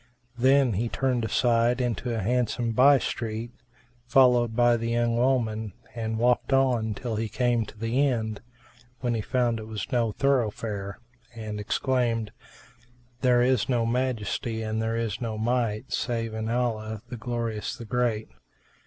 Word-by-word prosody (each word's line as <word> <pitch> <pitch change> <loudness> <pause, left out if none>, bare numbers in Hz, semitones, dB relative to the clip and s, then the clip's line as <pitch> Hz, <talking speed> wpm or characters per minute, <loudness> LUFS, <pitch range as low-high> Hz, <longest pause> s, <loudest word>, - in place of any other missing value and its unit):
Then 130 -1 +4
he 115 +5 -1
turned 130 -2 0
aside 120 +2 +2
into 120 -1 -1
a 110 -4 -2
handsome 120 +1 0
by 135 +5 +6
street, 115 -1 -4 0.6
followed 125 -3 +4
by 120 0 +4
the 115 0 -2
young 120 0 +1
woman, 115 -4 0 0.2
and 110 -2 -3
walked 125 +3 +2
on 125 -5 +2
till 115 -1 -4
he 110 0 -2
came 115 0 +1
to 105 - -13
the 115 +6 +1
end, 110 -5 -2 0.6
when 120 -2 0
he 115 - -1
found 120 0 0
it 110 - -8
was 110 +2 -5
no 120 -4 +1
thoroughfare 105 -6 -1 0.4
and 110 -2 -5
exclaimed, 115 0 0 0.9
"There 125 -2 +4
is 130 +1 +2
no 120 -3 +2
Majesty 115 -2 -1
and 110 0 -2
there 115 +1 -1
is 115 0 -2
no 110 -2 -3
Might 115 +1 -1
save 115 -2 -2
in 110 0 -3
Allah, 110 -3 -2
the 125 - -5
Glorious, 115 -2 -3
the 115 - -9
Great!" 115 -1 0
115 Hz, 155 wpm, -26 LUFS, 110-125 Hz, 0.9 s, by